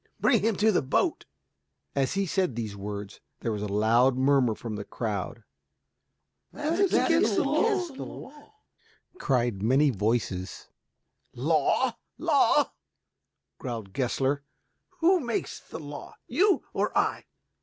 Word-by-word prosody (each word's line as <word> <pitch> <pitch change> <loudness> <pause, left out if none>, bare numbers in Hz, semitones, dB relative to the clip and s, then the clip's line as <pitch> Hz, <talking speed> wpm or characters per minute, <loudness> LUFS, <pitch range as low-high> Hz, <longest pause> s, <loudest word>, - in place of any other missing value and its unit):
Bring 230 -6 +3
him 220 +1 +1
to 215 +3 +3
the 185 - +2
boat." 130 - 0 0.7
As 135 -2 +1
he 195 0 +1
said 180 - 0
these 110 -3 -4
words, 100 0 -6 0.2
there 115 - -1
was 105 -2 -3
a 105 - -2
loud 115 +5 +3
murmur 130 -4 +3
from 115 -2 -6
the 105 - -5
crowd. 100 -5 -4 1.1
"That 310 +5 -2
is 395 -2 +3
against - - +3
the - - +3
law," 330 -7 -2 0.7
cried 120 -7 0
many 135 +6 +4
voices. 105 -4 -2 0.7
"Law, - - +2 0.2
law?" - - +3 0.9
growled 110 -6 -6
Gessler. 135 +2 0 0.6
"Who 360 +3 +5
makes 240 -6 -3
the - - -9
law, 145 -2 -9
you 380 - +3
or - - 0
I?" - - +1
130 Hz, 125 wpm, -27 LUFS, -, 1.1 s, Who